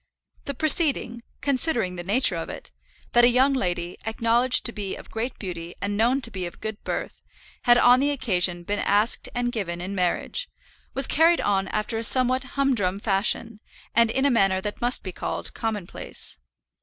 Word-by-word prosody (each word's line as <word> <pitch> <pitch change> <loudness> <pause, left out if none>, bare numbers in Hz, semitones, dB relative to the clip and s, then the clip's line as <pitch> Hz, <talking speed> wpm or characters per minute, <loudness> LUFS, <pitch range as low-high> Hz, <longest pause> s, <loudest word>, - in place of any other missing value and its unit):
The 280 - -4
proceeding, 290 -6 +2 0.2
considering 255 - 0
the 175 - -5
nature 205 +1 +2
of 165 - -5
it, - - -8 0.4
that 240 - +5
a 240 - +7
young 260 +3 +3
lady, 175 -7 -2
acknowledged 230 +3 +2
to 235 - -1
be 205 -4 -5
of - - -13
great 235 +3 -4
beauty 175 -3 -7
and 205 0 -3
known 240 +6 +2
to 230 - -4
be 185 -4 -4
of 175 - -12
good 220 -1 -6
birth, - - -5 0.4
had 240 0 +6
on 245 +1 +6
the 285 +2 +1
occasion 180 -10 0
been 205 +3 -2
asked 210 +4 +1
and 245 0 -1
given 185 -7 -4
in 185 +3 -5
marriage, 195 - -1 0.5
was 270 - +5
carried 330 +4 +3
on 195 -1 0
after 215 +2 -2
a - - -4
somewhat 255 +2 +5
humdrum 230 -10 +1
fashion, 210 +2 0 0.3
and 230 0 +4
in 265 +4 0
a 280 - +3
manner 195 -5 +2
that 205 +2 -6
must 245 +1 +3
be 185 - -5
called - - -4
commonplace. 205 - -4
225 Hz, 180 wpm, -24 LUFS, 195-255 Hz, 0.5 s, a